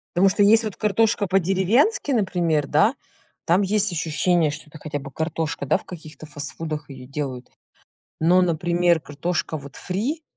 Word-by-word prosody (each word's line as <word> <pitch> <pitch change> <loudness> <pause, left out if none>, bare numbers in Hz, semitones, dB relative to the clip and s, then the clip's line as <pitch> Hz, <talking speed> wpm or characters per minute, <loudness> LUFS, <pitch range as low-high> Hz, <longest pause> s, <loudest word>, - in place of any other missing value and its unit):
Потому 195 +2 +5
что 205 - +2
есть 225 +3 +5
вот 215 -3 -4
картошка 215 -1 +1
по-деревенски, 195 - +2
например, 175 - +1
да, 210 - +3 0.5
там 180 +4 +3
есть 205 +1 +1
ощущение, 165 -1 +1
что 150 +2 -8
это 155 - -12
хотя 145 -1 -4
бы 135 0 -9
картошка, 160 -2 -3
да, - - +3
в - - -15
каких-то 155 -3 -10
фастфудах 150 0 -6
её 130 -2 -10
делают. 135 -3 -5 0.7
Но, 175 +3 +4
например, 175 0 +2
картошка 155 +2 -3
вот 140 -2 -11
фри, 245 - -3
170 Hz, 155 wpm, -23 LUFS, 150-195 Hz, 0.7 s, Потому